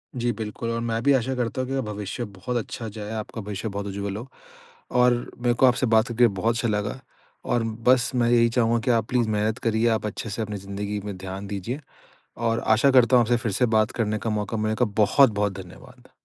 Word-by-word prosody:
जी, 120 -1 0
बिल्कुल 110 +1 -5
और 115 - -1
मैं 115 -1 -1
भी 140 - +5
आशा 130 0 +1
करता 125 +1 -2
हूँ 130 - -4
कि 135 0 -1
भविष्य 105 +3 -5
बहुत 120 +7 -3
अच्छा 115 0 -5
जाए, 105 0 -7
आपका 110 +1 -5
भविष्य 105 +1 -5
बहुत 100 0 -4
उज्ज्वल 100 0 -4
हो 120 +4 -7 0.7
और 125 0 +5 0.3
मैं 120 - +4
को 130 - +4
आपसे 125 0 +3
बात 110 +1 +4
करके 120 +1 +4
बहुत 110 +3 0
अच्छा 115 +1 0
लगा। 105 +4 -2 0.5
और 120 -1 +1 0.3
बस 125 -1 +4
मैं 120 -1 +2
यही 115 -1 +5
चाहूँगा 115 -1 +2
कि 125 - +3
आप 115 -2 +1
प्लीज़ 120 -3 +1
मेहनत 105 +1 0
करिए, 115 -1 +1
आप 110 -1 0
अच्छे 105 +2 -4
से 105 +3 -4
अपनी 105 -1 -4
ज़िंदगी 100 +1 -4
में 100 -2 -5
ध्यान 95 +1 -6
दीजिए। 105 +7 -4 0.6
और 115 0 0
आशा 110 +5 +4
करता 125 -1 +5
हूँ 120 - +5
आपसे 120 +1 +2
फ़िर 115 -3 -2
से 125 +6 +2
बात 110 0 +2
करने 110 -2 -1
का 115 - -3
मौका 105 +1 -2
मिलेगा, 110 +3 +1
बहुत-बहुत 105 0 +3
धन्यवाद। 90 - -15
115 Hz, 220 wpm, -24 LUFS, 105-120 Hz, 0.7 s, भी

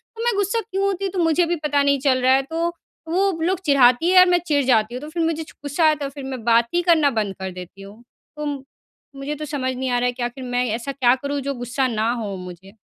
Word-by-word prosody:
तो 455 - -5
मैं 475 - +2
गुस्सा 405 +3 0
क्यों 385 +1 -1
होती 395 0 -1
तो 375 0 -4
मुझे 330 +1 +3
भी 345 +1 -1
पता 290 -1 +2
नहीं 280 -1 +2
चल 260 -2 +1
रहा 255 +1 +4
है। 265 - +4
तो, 330 +4 -2 0.4
वो 385 +4 +2
लोग 360 +2 0
चिढ़ाती 275 +2 +4
है 370 0 +7
और 365 - +8
मैं 355 - +4
चिढ़ 285 -2 +2
जाती 235 -2 +2
हूँ 250 - -5
तो 300 - -8
फिर 335 +2 -3
छु - - +2
मुझे 320 0 -3 0.2
गुस्सा 290 +4 -1
आया 310 - +5
तो 285 -2 -5
फिर 280 0 -10
मैं 260 -4 -6
बात 235 0 +4
ही 350 - +2
करना 330 -5 +4
बंद 200 -3 -3
कर 190 0 -4
देती 180 +2 -11
हूँ। 205 +4 -13 0.3
तो 300 - -4 0.7
मुझे 275 +2 -5
तो 305 - -6
समझ 270 -3 -2
नहीं 260 +1 -3
आ 245 - +2
रहा 245 - 0
है 245 - +1
कि 245 0 -5
आख़िर 245 +2 -5
मैं 245 0 0
ऐसा 240 +4 -5
क्या 255 -2 +3
करूँ 285 0 -2
जो - - -1
गुस्सा 245 +2 -1
ना 225 0 0
हों 215 -5 -4
मुझे? 180 +2 -11
275 Hz, 270 wpm, -21 LUFS, 245-325 Hz, 0.7 s, और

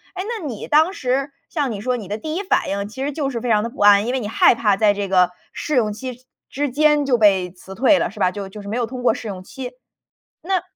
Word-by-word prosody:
诶， 370 - -3 0.2
那 320 - -7
你 230 -6 -6
当 320 +5 +4
时 270 0 -1 0.2
像 290 -5 -1
你 205 -2 -5
说 250 +1 -1
你 205 -5 -8
的 210 +2 -3
第 310 +5 -5
1 395 - -2
反 - - +1
应 200 +1 -2
其 260 +5 -6
实 290 - -1
就 280 -2 -2
是 235 -4 -4
非 245 - -3
常 210 -1 +3
的 235 - -3
不 265 - -16
安， 205 +1 +6
因 250 - -1
为 265 - 0
你 205 - -4
害 230 - +5
怕 205 -4 +2
在 210 -1 +4
这 200 -1 -3
个 180 -2 +4 0.2
试 300 - -3
用 215 -4 +2
期 255 +3 -8 0.2
之 285 0 -2
间 295 +1 +3
就 250 -3 +2
被 190 -4 +3
辞 190 +1 -12
退 275 +5 +4
了， - - 0
是 210 - -13
吧， 180 - +3
就 200 -1 -6
就 205 +2 -10
是 200 - -8
没 230 - -2
有 240 - 0
通 250 +1 -7
过 - - +4
试 225 - -7
用 185 -2 -6
期。 255 +4 -7 0.7
那 370 +1 0
240 Hz, 295 characters per minute, -21 LUFS, 205-275 Hz, 0.7 s, 安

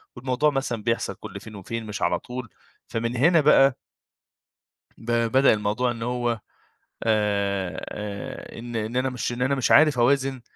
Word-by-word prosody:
والموضوع 130 +3 +1
مثلًا 135 -6 -2
بيحصل 115 +1 -1
كل - - -9
فين 110 - -11
وفين 110 +4 -5
مش 105 -1 -6
على 85 - +1
طول." 125 -2 -7 0.4
فمن 115 +1 -2
هنا 165 +5 +5
بقى 135 -3 +5 1.2
ب 120 +1 -4 0.2
بدأ 135 +1 +5
الموضوع 105 +4 0
إن 115 -1 -6
هو 120 -1 -1 0.6
آآ 100 -4 0
آآ 105 +1 -7
إن 120 0 -7
إن 110 +1 -3
أنا 130 +1 +1
مش 125 -1 -3
إن 120 +1 -5
أنا 130 +2 +2
مش 130 - 0
عارف 150 -4 +6
أوازن 135 +1 +2
120 Hz, 160 wpm, -25 LUFS, 110-130 Hz, 1.2 s, عارف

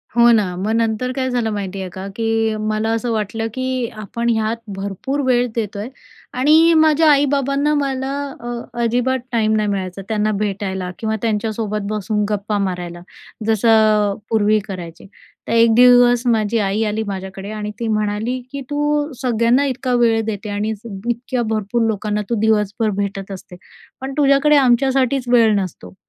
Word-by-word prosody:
हो 240 0 +6
ना. 200 -6 +2
मग 205 +4 -2
नंतर 230 +2 0
काय 260 -1 -1
झालं 240 -3 0
माहिती 195 -1 -4
आहे 185 - -5
का, 190 +2 -7
की 225 -1 0
मला 215 +1 -1
असं 230 +1 -2
वाटलं 225 +1 -2
की 255 -2 -2 0.2
आपण 235 +3 -2
ह्यात 220 0 0 0.2
भरपूर 200 +9 -3
वेळ 245 -1 +2
देतो 210 -3 -3
आहे 220 +5 -5 0.5
आणि 320 +4 +5
माझ्या 315 0 +4
आई-बाबांना 280 +1 +2
मला 270 -1 -1 0.3
अ, 240 - -8 0.4
अजिबात 250 +3 +1
टाईम 220 -2 +2
नाही 215 -1 +1
मिळायचा. 190 -1 -3
त्यांना 215 -1 0
भेटायला 190 -3 -3
किंवा 220 -1 -1
त्यांच्यासोबत 215 -2 -2
बसून 210 0 -1
गप्पा 210 0 -1
मारायला. 180 -3 -3 0.4
जसं 225 +1 +2 0.4
अ, - - -2 0.2
पूर्वी 215 -1 +3
करायचे. 175 -2 -8 0.4
तर - - -3
एक 230 -1 +5
दिवस 245 -1 +6
माझी 225 -1 +1
आई 205 +2 0
आली 215 +1 -1
माझ्याकडे 190 0 -6
आणि 210 -1 -4
ती 230 - -2
म्हणाली 215 +3 -1
की 280 -1 -5
"तू 295 +1 0
सगळ्यांना 240 +2 +2
इतका 255 -1 -2
वेळ 230 -2 +3
देते 215 -1 -4
आणि 205 +2 -2
इतक्या 235 +3 -4
भरपूर 220 +2 -1
लोकांना 210 0 -1
तू 235 - +1
दिवसभर 215 0 +1
भेटत 195 -1 -3
असते, 185 -1 -9 0.5
पण 270 +1 -5
तुझ्याकडे 285 +1 +4
आमच्यासाठीच 260 0 +2
वेळ 230 -3 +4
नसतो 185 -1 -7
225 Hz, 160 wpm, -19 LUFS, 205-250 Hz, 0.5 s, हो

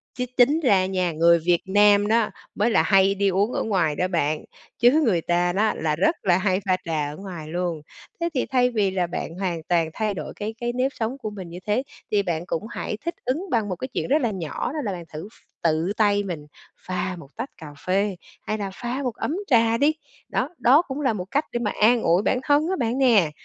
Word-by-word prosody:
Chứ 250 - -2
tính 275 +6 +5
ra 200 - +3
nha, 185 -2 0
người 170 +1 +4
Việt 175 +1 +2
Nam 205 +1 +5
đó 225 -1 +2 0.3
mới 220 +3 +2
là 160 - +4
hay 195 +2 +4
đi 200 0 +2
uống 200 +5 +1
ở - - -1
ngoài 180 -8 +1
đó 180 - 0
bạn, 155 -4 0 0.4
chứ 250 +6 +5
người 185 -9 +2
ta 175 +1 +1
đó 215 +3 +2
là 155 -1 -1
rất 310 - +2
là 175 -2 +4
hay 190 0 +1
pha 185 -1 +2
trà 155 -3 -1
ở - - -8
ngoài 180 -6 -8
luôn. 170 -1 -2 0.4
Thế 340 - +1
thì 260 - 0
thay 250 -1 +2
vì 210 -5 +1
là 185 -2 0
bạn 170 -1 -5
hoàn 180 -3 -2
toàn 170 -2 +2
thay 215 +1 -1
đổi 155 -6 -6
cái 215 +2 -5
cái 240 -1 -2
nếp 255 +2 0
sống 230 +4 -3
của 215 - -5
mình 190 -4 -8
như 175 - -8
thế 215 +5 +1 0.3
thì 205 -1 +2
bạn 170 -2 -2
cũng 165 - -3
hãy 215 - -4
thích 340 - -2
ứng 275 +10 -1
bằng 225 -5 0
một 185 - -2
cái 255 - -5
chuyện 255 - -3
rất 295 +4 +3
là 235 -4 +1
nhỏ 175 +3 -4
đó 310 - -3
là 205 - -1
bạn 175 -2 -6
thử 155 +5 -6
ph - - -23 0.3
tự 165 +2 +1
tay 205 -2 +3
mình 170 -6 -5 0.3
pha 185 0 -3
một 145 - -12
tách 270 - -4
cà 160 - -10 0.2
phê, 195 +2 +1 0.3
hay 215 - -3
là 200 -2 -4
pha 245 +6 -4
một 245 -4 -2
ấm 310 - -2
trà 230 -3 +4
đi. 290 +5 +3 0.4
Đó, 260 - -1
đó 275 +7 +5
cũng 285 -3 -6
là 260 -5 +2
một 180 -4 -4
cách 290 +3 +1
để 240 - -2
mà 215 -4 -1
an 235 +2 +5
ủi 175 0 +3
bản 250 - +1
thân 295 +3 +3
á 380 - +1
bạn 235 +2 0
nè. 225 - +4
200 Hz, 245 wpm, -24 LUFS, 175-240 Hz, 0.4 s, tính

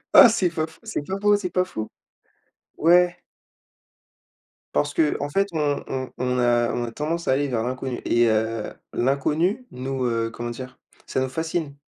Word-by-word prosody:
Ah! 240 - +11
c'est 195 -5 +2
pas 160 -1 -2
faux, 160 - -18
c'est 220 -9 -3
pas 190 +5 -3
faux, 205 0 +4
c'est 190 -3 -2
pas 185 +1 +1
faux. 110 -10 -5 0.9
Ouais. 175 +2 +4 1.6
Parce - - 0
qu'en 310 - +1
fait 195 +6 +1
on 150 -3 0
on 130 -1 -4
on 125 0 0
a 120 -1 +3
on 120 - -1
a 115 - -6
tendance 165 +6 -3
à - - +4
aller 145 +2 +1
vers 120 -4 -1
l'inconnu 130 0 -3
et 120 0 +3
heu, 110 0 0 0.2
l'inconnu 155 - 0
nous, 130 +1 -4
heu, 115 -1 0
comment 120 +1 -5
dire? 130 +2 -8 0.3
Ça - - -1
nous 130 0 0
fascine. 160 0 -3
140 Hz, 175 wpm, -24 LUFS, 120-175 Hz, 1.6 s, Ah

